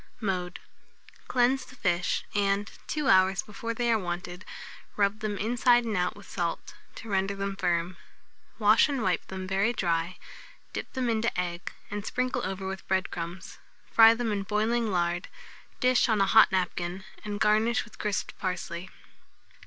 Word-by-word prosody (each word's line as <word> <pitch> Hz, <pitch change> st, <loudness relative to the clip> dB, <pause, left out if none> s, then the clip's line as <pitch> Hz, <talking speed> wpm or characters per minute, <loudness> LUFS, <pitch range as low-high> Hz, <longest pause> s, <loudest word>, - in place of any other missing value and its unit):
Mode. 185 Hz, -4 st, -2 dB, 0.7 s
Cleanse 255 Hz, +1 st, +2 dB
the 255 Hz, -, -14 dB
fish, 180 Hz, -6 st, 0 dB
and, 200 Hz, 0 st, +1 dB, 0.2 s
two 300 Hz, -2 st, -1 dB
hours 190 Hz, -4 st, +4 dB
before 230 Hz, +2 st, -5 dB
they 240 Hz, 0 st, +1 dB
are 225 Hz, -, +3 dB
wanted, 175 Hz, 0 st, -5 dB, 0.5 s
rub 200 Hz, +1 st, +1 dB
them 215 Hz, -2 st, -3 dB
inside 240 Hz, +3 st, +3 dB
and 220 Hz, -2 st, -1 dB
out 180 Hz, -1 st, 0 dB
with 205 Hz, -1 st, -14 dB
salt, 170 Hz, -2 st, -3 dB, 0.2 s
to 225 Hz, -, -9 dB
render 195 Hz, -1 st, 0 dB
them 195 Hz, 0 st, -3 dB
firm; 175 Hz, -2 st, -1 dB, 0.6 s
wash -, -, +5 dB
and 270 Hz, -5 st, -1 dB
wipe 185 Hz, -3 st, 0 dB
them 190 Hz, 0 st, -5 dB
very 195 Hz, +4 st, +1 dB
dry, 170 Hz, -3 st, -1 dB, 0.6 s
dip -, -, -5 dB
them 260 Hz, -2 st, -1 dB
into 225 Hz, -4 st, 0 dB
egg, 175 Hz, -1 st, -3 dB, 0.2 s
and 205 Hz, 0 st, -3 dB
sprinkle 255 Hz, +2 st, -1 dB
over 190 Hz, 0 st, -3 dB
with 190 Hz, 0 st, -6 dB
bread 190 Hz, 0 st, 0 dB
crumbs; 170 Hz, +2 st, -6 dB, 0.3 s
fry 225 Hz, 0 st, +8 dB
them 230 Hz, -1 st, -1 dB
in 205 Hz, -1 st, -1 dB
boiling 215 Hz, +3 st, 0 dB
lard, 175 Hz, -1 st, 0 dB, 0.5 s
dish 255 Hz, -1 st, +3 dB
on 220 Hz, -2 st, +3 dB
a 195 Hz, -, +4 dB
hot 220 Hz, +1 st, +6 dB
napkin, 180 Hz, 0 st, -1 dB, 0.2 s
and 205 Hz, -1 st, -4 dB
garnish 220 Hz, +2 st, +3 dB
with 225 Hz, -, -17 dB
crisped 210 Hz, -2 st, -2 dB
parsley. 180 Hz, -1 st, -4 dB
200 Hz, 160 wpm, -28 LUFS, 185-225 Hz, 0.7 s, fry